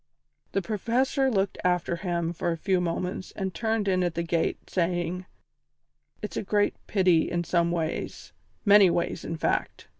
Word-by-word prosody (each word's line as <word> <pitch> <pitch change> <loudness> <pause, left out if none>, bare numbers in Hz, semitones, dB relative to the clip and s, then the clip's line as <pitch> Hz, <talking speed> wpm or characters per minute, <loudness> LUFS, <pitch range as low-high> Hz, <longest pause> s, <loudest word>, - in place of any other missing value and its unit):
The 195 - 0
Professor 245 +6 +1
looked 195 -5 0
after 180 -1 +1
him 170 -2 -2
for 170 +1 -1
a 165 - -2
few 185 +1 +1
moments 180 +2 -3
and 190 -2 -3
turned 220 +3 -1
in 185 -1 +2
at 175 -2 -1
the 170 - -1
gate, 165 -1 -1
saying: 175 0 -1 1.0
"It's 210 - -4
a - - 0
great 205 +1 +1
pity 180 -5 +3
in 175 0 -1
some 170 0 +1
ways 165 -2 -3 0.3
many 200 -2 +7
ways, 170 -1 -1
in 165 - -4
fact. - - -2
180 Hz, 160 wpm, -27 LUFS, 170-200 Hz, 1.0 s, many